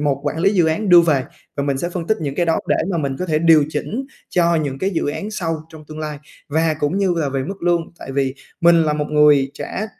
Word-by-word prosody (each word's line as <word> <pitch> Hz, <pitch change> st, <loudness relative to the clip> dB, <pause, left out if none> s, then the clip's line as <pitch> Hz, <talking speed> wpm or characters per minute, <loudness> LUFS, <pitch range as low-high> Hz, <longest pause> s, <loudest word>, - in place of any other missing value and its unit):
một 140 Hz, -2 st, 0 dB
quản 145 Hz, +2 st, -2 dB
lý 190 Hz, +4 st, +3 dB
dự 175 Hz, -4 st, +3 dB
án 165 Hz, +7 st, 0 dB
đưa 175 Hz, -1 st, +9 dB
về, 150 Hz, -6 st, +2 dB, 0.3 s
và 140 Hz, -, -1 dB
mình 140 Hz, -2 st, -1 dB
sẽ 175 Hz, -, -2 dB
phân 170 Hz, -2 st, -5 dB
tích 220 Hz, -, +2 dB
những 140 Hz, -3 st, -3 dB
cái 175 Hz, +3 st, 0 dB
đó 165 Hz, -, +2 dB
để -, -, +3 dB
mà 170 Hz, -, -1 dB
mình 135 Hz, -3 st, -2 dB
có 185 Hz, -, -3 dB
thể 155 Hz, -3 st, +1 dB
điều 160 Hz, -2 st, +5 dB
chỉnh 245 Hz, +11 st, -4 dB, 0.2 s
cho 170 Hz, -1 st, +2 dB
những 140 Hz, -4 st, -2 dB
cái 190 Hz, -, 0 dB
dự 170 Hz, -, -1 dB
án 200 Hz, +8 st, -4 dB
sau 165 Hz, -6 st, -2 dB
trong 160 Hz, -1 st, -13 dB
tương 155 Hz, 0 st, -8 dB
lai. 150 Hz, -2 st, -5 dB, 0.3 s
Và 160 Hz, +1 st, +1 dB
cũng 150 Hz, +7 st, 0 dB
như 190 Hz, -3 st, +1 dB
là 150 Hz, -4 st, 0 dB
về 135 Hz, -1 st, -2 dB
mức 195 Hz, +2 st, -7 dB
lương, 175 Hz, -1 st, +2 dB, 0.2 s
tại 135 Hz, -, -8 dB
vì 135 Hz, -1 st, 0 dB, 0.3 s
mình 170 Hz, -1 st, +5 dB
là 150 Hz, -1 st, +1 dB
một 150 Hz, 0 st, -2 dB
người 150 Hz, -3 st, +4 dB
trả 215 Hz, -, -4 dB
160 Hz, 270 wpm, -20 LUFS, 145-175 Hz, 0.3 s, đưa